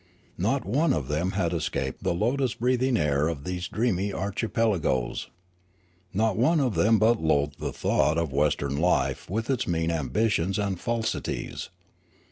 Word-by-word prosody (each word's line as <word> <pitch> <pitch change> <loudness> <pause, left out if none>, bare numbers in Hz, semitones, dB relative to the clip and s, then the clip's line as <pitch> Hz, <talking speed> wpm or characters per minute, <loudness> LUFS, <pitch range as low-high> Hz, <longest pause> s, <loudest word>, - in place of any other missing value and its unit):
Not - - 0
one 140 - +2
of 65 -4 -2
them 80 +6 0
had 90 -3 0
escaped 70 -5 -2
the - - 0
lotus 125 +6 0
breathing 125 +1 +1
air 75 -3 +1
of 80 -4 -4
these 90 +1 -3
dreamy 100 -4 0
archi 100 +5 -2
pelagoes. 95 - 0 0.8
Not 110 +1 +1
one 135 - +3
of 130 -5 +1
them 110 +3 +4
but 110 +2 +3
loathed 75 -2 +1
the - - -3
thought 75 +4 +1
of 85 -5 -1
western 70 -1 +1
life 70 -6 +1
with 110 +5 -2
its 130 - -1
mean 80 -1 0
ambitions 85 - 0
and 100 -3 -1
falsities. 115 0 -3
95 Hz, 155 wpm, -26 LUFS, 75-115 Hz, 0.8 s, them